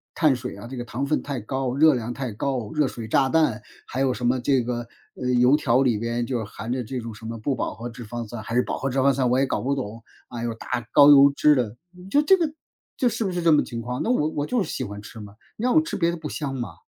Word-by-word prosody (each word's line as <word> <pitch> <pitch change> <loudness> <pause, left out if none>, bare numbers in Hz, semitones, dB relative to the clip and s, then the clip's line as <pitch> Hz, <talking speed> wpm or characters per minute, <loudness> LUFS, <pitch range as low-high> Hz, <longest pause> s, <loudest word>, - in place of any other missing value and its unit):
碳 155 -5 +3
水 125 0 -6
啊， - - -9
这 130 - -7
个 120 - -3
糖 125 +4 -3
分 150 - 0
太 140 -3 -4
高、 130 +3 -3
热 155 +1 +6
量 120 -1 -3
太 130 -3 -4
高、 120 -2 -3
热 150 -3 +2
水 115 -3 -7
炸 135 +4 +2
弹、 145 -8 +2 0.2
还 130 - -5
有 135 -1 +2
什 125 - -4
么 125 +1 +2
这 130 +1 +2
个， 120 0 -3 0.3
呃， 125 - -3
油 125 +4 +6
条 130 -3 +2
里 120 -4 +2
边 115 +2 -2
就 125 -1 -2
是 - - -3
含 105 +3 -7
的 125 -1 -1
这 125 +3 -5
种 115 -1 -7
什 110 +2 -12
么 115 +1 -5
不 135 +5 -1
饱 - - -3
和 120 +2 -6
脂 120 +1 -9
肪 120 +1 -5
酸 115 0 -7
还 115 - -5
是 125 - +4
饱 - - -3
和 135 - -2
脂 130 - -3
肪 140 +1 +4
酸？ 130 -2 +1
我 125 - +2
也 135 - +3
搞 - - -2
不 140 +2 0
懂， 115 -3 -6 0.3
啊， 120 -1 -6
有 120 - -1
大 - - -12 0.2
高 145 0 +8
油 140 0 +8
脂 150 +1 +5
的， 120 -4 -1 0.3
就 290 - +4
这 385 +6 +6
个， 330 -4 0 0.5
就 255 - +2
是 235 - -1
不 190 - -1
是 175 -1 -3
这 165 - +5
么 150 - +5
情 115 -1 -6
况？ 125 +2 -4
那 - - -1
我 155 -12 +2
我 145 -2 -2
就 245 -5 +1
是 - - -7
喜 - - -3
欢 105 0 -7
吃 110 +2 -11
嘛， 105 -1 -11 0.2
你 215 - -6
让 250 +3 +2
我 315 - +7
吃 325 - -5
别 170 -2 +2
的 170 - -3
不 155 -1 -6
香 140 -3 -4
嘛。 120 -2 -5
125 Hz, 320 characters per minute, -24 LUFS, 120-145 Hz, 0.5 s, 高